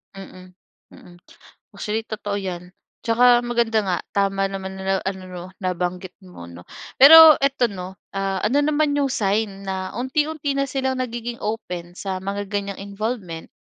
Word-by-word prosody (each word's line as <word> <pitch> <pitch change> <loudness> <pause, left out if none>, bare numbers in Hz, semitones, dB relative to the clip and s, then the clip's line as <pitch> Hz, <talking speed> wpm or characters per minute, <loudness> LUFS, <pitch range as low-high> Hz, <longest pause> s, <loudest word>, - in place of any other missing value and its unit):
Mm, 185 -1 -12 0.3
mm. 175 - -16 0.6
Actually, 220 +1 -3
totoo 210 -2 -4
'yan. 180 -2 -6 0.3
Tsaka 240 +1 +4
maganda 235 -2 +1
nga, 185 -3 -1 0.2
tama 195 -1 +1
naman 190 0 -5
na 190 0 -1
ano, 190 -1 -4
'no, 180 -1 -8
nabanggit 180 0 -3
mo 180 - -12
'no. 85 +1 -12 0.4
Pero 320 +2 +11
ito 275 -2 +2
'no, 190 -3 -7 0.2
ah, 195 -1 -2
ano 280 +7 +2
naman 300 0 +1
yung 280 -1 +1
sign 200 -3 -1
na 190 -1 -3
unti-unti 295 +3 -1
na 275 -1 -1
silang 265 -1 -1
nagiging 240 -1 -5
open 180 -5 -5
sa 190 -2 -4
mga 200 +1 -4
ganiyang 200 -1 -4 0.2
involvement? 200 -6 -4
200 Hz, 150 wpm, -22 LUFS, 185-245 Hz, 0.6 s, Pero